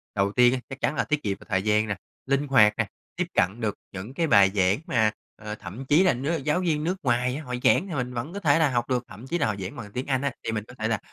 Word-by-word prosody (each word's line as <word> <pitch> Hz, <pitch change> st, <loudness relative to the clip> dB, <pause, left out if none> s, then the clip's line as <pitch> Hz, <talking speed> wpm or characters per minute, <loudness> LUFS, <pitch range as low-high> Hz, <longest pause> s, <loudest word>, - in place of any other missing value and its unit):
Đầu 100 Hz, 0 st, +1 dB
tiên 125 Hz, +2 st, +5 dB
á 130 Hz, -, -1 dB
chắc 135 Hz, 0 st, -7 dB
chắn 150 Hz, -, +1 dB
là -, -, +1 dB
tiết 150 Hz, -1 st, -1 dB
kiệm 100 Hz, -2 st, -1 dB
về -, -, -15 dB
thời 95 Hz, -2 st, +1 dB
gian 110 Hz, +1 st, +2 dB
nè, 100 Hz, -, -1 dB, 0.3 s
linh 140 Hz, +2 st, 0 dB
hoạt 110 Hz, -6 st, +6 dB
nè, 115 Hz, -3 st, +1 dB, 0.3 s
tiếp -, -, 0 dB
cận 95 Hz, +6 st, +1 dB
được 105 Hz, -2 st, -1 dB, 0.2 s
những 100 Hz, +6 st, -7 dB
cái 165 Hz, +3 st, 0 dB
bài 100 Hz, -9 st, +6 dB
giảng 95 Hz, +4 st, +3 dB
mà, 110 Hz, -3 st, +3 dB, 0.2 s
ờ, 105 Hz, 0 st, -7 dB
thậm 105 Hz, +6 st, -8 dB
chí 150 Hz, +7 st, +5 dB
là 185 Hz, -, +4 dB
nước 140 Hz, +7 st, -1 dB
giáo 150 Hz, +5 st, 0 dB
viên 155 Hz, -4 st, 0 dB
nước 180 Hz, +4 st, 0 dB
ngoài 125 Hz, 0 st, +1 dB
á, 155 Hz, -, -5 dB
họ 125 Hz, -2 st, -6 dB
giảng 195 Hz, -, +4 dB
thì 175 Hz, -, -6 dB
mình 125 Hz, -1 st, -2 dB
vẫn 125 Hz, +8 st, -4 dB
có 200 Hz, -, -4 dB
thể 155 Hz, -4 st, +3 dB
là 155 Hz, -, +4 dB
học 120 Hz, -2 st, -1 dB
được. 125 Hz, -1 st, 0 dB
Thậm 120 Hz, +5 st, -11 dB
chí 175 Hz, -, -1 dB
là 145 Hz, -, +1 dB
họ 105 Hz, -, -1 dB
giảng 95 Hz, 0 st, -6 dB
bằng 105 Hz, -3 st, -8 dB
tiếng 125 Hz, +5 st, -4 dB
Anh 130 Hz, -2 st, +1 dB
á, 140 Hz, -1 st, 0 dB
thì -, -, -2 dB
mình 105 Hz, -2 st, -2 dB
có 125 Hz, -, -12 dB
thể 110 Hz, -, 0 dB
là, 110 Hz, -3 st, 0 dB
125 Hz, 305 wpm, -26 LUFS, 105-145 Hz, 0.3 s, hoạt